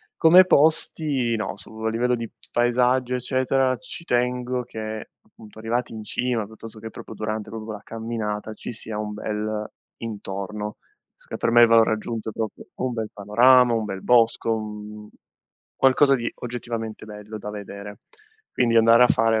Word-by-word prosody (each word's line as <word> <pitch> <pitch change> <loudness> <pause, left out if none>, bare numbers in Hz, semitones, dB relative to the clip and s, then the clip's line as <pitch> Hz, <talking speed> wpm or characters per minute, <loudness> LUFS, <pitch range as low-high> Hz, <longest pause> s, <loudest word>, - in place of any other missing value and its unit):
Come 180 +3 +7
posti, 145 -6 +2
no, 110 -2 -3
su - - -10
a 110 0 0
livello 120 +2 +1
di 115 -2 -3 0.2
paesaggio 125 +1 +2
eccetera, 130 +1 +1
ci 170 0 -8
tengo 125 0 0
che 110 -2 -6
appunto 110 0 -16
arrivati 120 +2 -2
in 110 -1 -7
cima, 120 -1 -1
piuttosto 110 +1 -11
che 110 +1 -7
proprio 110 - -10
durante 110 0 -4
proprio 110 -1 -7
quella 110 -2 -7
camminata, 110 -2 -4
ci - - -7
sia 110 -1 -6
un 105 0 -4
bel 105 0 -3 0.3
intorno. 105 -1 -5 0.4
So - - -26
che - - -5
per 115 - 0
me 120 0 +7
il - - +7
valore 115 -1 +5
aggiunto 110 0 -4
è - - -5
proprio 110 0 -5
un 130 -1 -2
bel 110 -2 -3
panorama, 120 +4 +5
un 115 -1 0
bel 95 -2 -5
bosco, 115 -1 +3
mhmm, 105 -1 -7
un 105 - -14 0.7
qualcosa 135 +1 +5
di 120 -3 -1
oggettivamente 115 -3 -5
bello 105 0 -8
da 105 - -7
vedere. 100 0 -8 0.5
Quindi 115 -2 +2
andare 115 +1 +7
a 125 - +6
fare 115 -1 +3
115 Hz, 170 wpm, -24 LUFS, 105-125 Hz, 0.7 s, Come